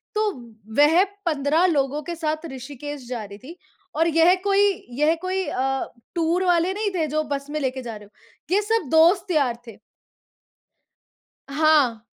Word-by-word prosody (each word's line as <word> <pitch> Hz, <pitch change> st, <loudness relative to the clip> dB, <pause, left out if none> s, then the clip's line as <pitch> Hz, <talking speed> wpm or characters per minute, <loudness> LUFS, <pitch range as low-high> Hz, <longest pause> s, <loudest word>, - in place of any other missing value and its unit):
तो 425 Hz, -1 st, +1 dB, 0.5 s
वह 325 Hz, +6 st, +6 dB, 0.2 s
15 310 Hz, +2 st, +2 dB
लोगों 280 Hz, +2 st, 0 dB
के 340 Hz, -, -3 dB
साथ 315 Hz, 0 st, -3 dB
ऋषिकेश 275 Hz, 0 st, -8 dB
जा 240 Hz, -4 st, -4 dB
रही 200 Hz, 0 st, -11 dB
थी 325 Hz, +8 st, -12 dB, 0.4 s
और 325 Hz, +2 st, +2 dB
यह 330 Hz, +3 st, +4 dB
कोई 400 Hz, 0 st, +3 dB, 0.4 s
यह 310 Hz, +2 st, +3 dB
कोई 375 Hz, 0 st, -2 dB
अ, 270 Hz, -1 st, -1 dB, 0.3 s
टूर 340 Hz, +2 st, +1 dB
वाले 355 Hz, +1 st, +2 dB
नहीं 420 Hz, 0 st, -1 dB
थे 320 Hz, -3 st, 0 dB
जो 310 Hz, 0 st, +1 dB
बस 280 Hz, +1 st, -8 dB
में 305 Hz, -, -2 dB
लेके 260 Hz, -1 st, -2 dB
जा 230 Hz, -2 st, -6 dB
रहे 205 Hz, -, -14 dB
हों। 355 Hz, -, -7 dB
ये 415 Hz, -, +3 dB
सब 445 Hz, -, +1 dB
दोस्त 350 Hz, +4 st, +4 dB
यार 265 Hz, -7 st, +1 dB
थे। 220 Hz, -, -11 dB, 1.7 s
हाँ। 280 Hz, -7 st, +2 dB
310 Hz, 160 wpm, -23 LUFS, 270-345 Hz, 1.7 s, वह